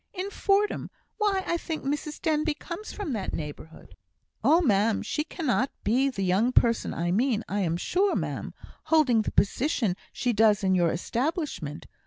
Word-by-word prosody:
"In 385 +2 -4
Fordham! 405 +1 +1 0.3
Why, 400 -3 +1
I 340 - 0
think 325 -2 -5
Mrs 295 +2 -3
Denbigh 310 -1 0
comes 370 +5 -7
from 390 -10 -4
that 205 -4 -3
neighbourhood." 155 +1 -8 0.5
"Oh, 325 - +5
ma'am! 215 - +2
she 300 - -1
cannot 280 -5 -1
be 255 +6 +2
the 195 -7 -3
young 195 +7 +2
person 235 -2 +3
I 175 +1 -1
mean 230 +2 +1
I 205 - -2
am 170 -4 0
sure, 380 - +1
ma'am - - -3 0.3
holding 275 -8 +4
the - - -3
position 225 - +1 0.2
she 245 - -1
does 215 -1 +4
in 190 -1 +3
your 175 -3 +3
establishment. 240 - -3
250 Hz, 165 wpm, -27 LUFS, 200-320 Hz, 0.5 s, Oh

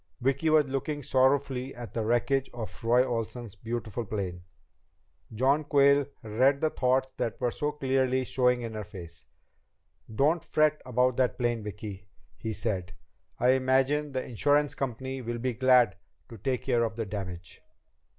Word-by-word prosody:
Vicki 135 +5 +1
was 155 -1 +5
looking 140 +2 -3
sorrowfully 130 0 +1
at 120 -1 -8
the 115 - -1
wreckage 125 +4 +1
of 115 -2 -7
Roy 120 +2 +4
Olsen's 115 -2 -4
beautiful 115 +1 -4
plane. 95 -4 -4 0.9
John 135 +7 +2
Quayle 140 -1 +4 0.2
read 130 +6 +2
the 155 +1 +1
thoughts 130 +1 +1
that 120 -3 -2
were 125 -2 0
so 150 +2 -2
clearly 130 -2 +1
showing 125 -1 +1
in 115 -1 -5
her 110 -1 -4
face. 85 -6 -10 0.9
"Don't 150 +9 +2
fret 155 0 +2
about 125 0 +2
that 130 -2 +1
plane, 120 -2 0
Vicki," 105 -1 -7 0.3
he 110 - -5
said. 95 -5 -3 0.4
"I 125 +1 +4
imagine 135 +3 +2
the 130 -1 -3
insurance 145 +5 +2
company 130 0 -4
will 120 0 -4
be 125 +1 -1
glad 125 -3 +4 0.3
to 115 - -10
take 130 +4 -1
care 120 -3 +2
of 110 -1 -2
the 115 -1 -3
damage." 90 -4 -7
125 Hz, 155 wpm, -28 LUFS, 110-135 Hz, 0.9 s, was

